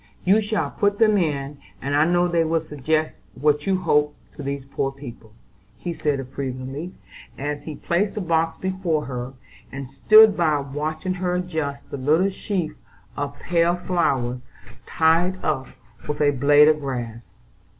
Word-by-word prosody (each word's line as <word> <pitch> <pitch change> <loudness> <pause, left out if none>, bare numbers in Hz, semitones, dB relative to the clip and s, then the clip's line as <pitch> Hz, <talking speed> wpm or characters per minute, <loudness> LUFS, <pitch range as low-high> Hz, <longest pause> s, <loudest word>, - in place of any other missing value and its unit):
You 200 +4 +5
shall 215 0 -1
put 205 0 +1
them 215 -1 +4
in, 145 -6 -1 0.2
and 140 +1 -2
I 150 +2 +4
know 175 +1 +2
they 170 -1 +2
will 165 +1 +1
suggest 155 +1 -1 0.2
what 150 +3 +1
you 190 -1 +2
hope 150 -4 +1 0.2
to - - -8
these 140 -1 -4
poor 135 0 -2
people," 120 -5 -11 0.5
he 175 - -4
said 150 -3 -1
approvingly, 135 +5 -5 0.4
as 145 +1 -4
he 155 - -6
placed 190 +7 -1
the 210 - -2
box 165 -2 0
before 185 -5 -1
her, 125 0 -5 0.4
and 135 0 -6
stood 215 - +6
by 155 -4 +2
watching 155 +6 -3
her 180 -1 0
adjust 160 -6 -4
the - - -4
little 155 +8 +2
sheaf 185 -5 -3 0.4
of 145 0 -4
pale 170 +2 +1
flowers 140 -9 0 0.5
tied 165 +3 +2
up 130 -4 -1 0.4
with 150 - -3
a 145 -1 +4
blade 145 +2 +5
of 155 -1 +4
grass. 120 -5 -6
155 Hz, 160 wpm, -23 LUFS, 140-175 Hz, 0.5 s, stood